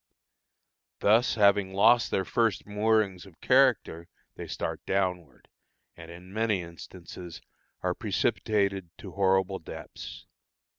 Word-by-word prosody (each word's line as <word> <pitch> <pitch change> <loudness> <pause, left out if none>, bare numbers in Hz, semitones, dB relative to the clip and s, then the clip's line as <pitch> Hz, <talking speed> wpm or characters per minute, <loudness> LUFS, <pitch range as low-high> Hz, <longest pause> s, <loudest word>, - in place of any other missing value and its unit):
Thus 115 +4 +4
having 100 -2 +3
lost 115 +4 +5
their 95 - 0
first 115 -4 0
moorings 105 -2 0
of 90 - -19
character, 125 -10 +2 0.3
they - - -8
start - - -4
downward, 90 -7 -2 0.5
and 85 -1 -12
in 90 +2 -12
many 110 -4 0
instances 85 +1 -10 0.4
are - - +1
precipitated 100 -4 -1
to - - -10
horrible 95 0 +1
depths. - - -10
95 Hz, 110 wpm, -28 LUFS, 90-110 Hz, 0.5 s, lost